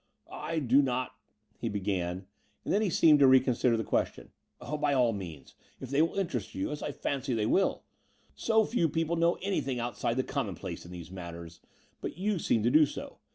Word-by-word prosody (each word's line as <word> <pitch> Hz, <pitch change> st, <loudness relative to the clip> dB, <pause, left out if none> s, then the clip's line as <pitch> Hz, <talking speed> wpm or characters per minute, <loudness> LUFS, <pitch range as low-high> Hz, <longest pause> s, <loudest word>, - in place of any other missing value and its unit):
"I 165 Hz, -, -3 dB
do 135 Hz, -2 st, +4 dB
not 130 Hz, -2 st, -1 dB, 0.2 s
..." 105 Hz, 0 st, -41 dB
he 115 Hz, -, -1 dB
began; 95 Hz, -3 st, -2 dB, 0.4 s
and -, -, 0 dB
then 205 Hz, -, +3 dB
he 210 Hz, -, +1 dB
seemed 155 Hz, -2 st, +5 dB
to 140 Hz, -, +7 dB
reconsider 130 Hz, -2 st, +4 dB
the 110 Hz, -, -1 dB
question. -, -, -2 dB, 0.3 s
By 150 Hz, -1 st, -1 dB
all 125 Hz, -3 st, +3 dB
means, 85 Hz, -8 st, -8 dB, 0.3 s
if 130 Hz, -, -8 dB
they 140 Hz, +2 st, +3 dB
will 165 Hz, +4 st, 0 dB
interest 150 Hz, -, -2 dB
you, 95 Hz, +7 st, -2 dB
as 150 Hz, -, -5 dB
I -, -, -3 dB
fancy 135 Hz, -2 st, -2 dB
they 110 Hz, -2 st, 0 dB
will. 190 Hz, -, +1 dB, 0.5 s
So 220 Hz, -1 st, +2 dB
few 175 Hz, -9 st, +1 dB
people 165 Hz, +2 st, 0 dB
know 170 Hz, +1 st, +2 dB
anything 140 Hz, -10 st, -1 dB
outside 120 Hz, 0 st, -2 dB
the 130 Hz, -, +2 dB
commonplace 95 Hz, -, -4 dB
in -, -, -11 dB
these 90 Hz, -1 st, -9 dB
matters: 85 Hz, -3 st, -8 dB, 0.4 s
but -, -, -5 dB
you 200 Hz, 0 st, 0 dB
seem 115 Hz, -8 st, +1 dB
to 120 Hz, -, +3 dB
do 155 Hz, +1 st, +6 dB
so. -, -, -8 dB
130 Hz, 200 wpm, -30 LUFS, 105-155 Hz, 0.5 s, to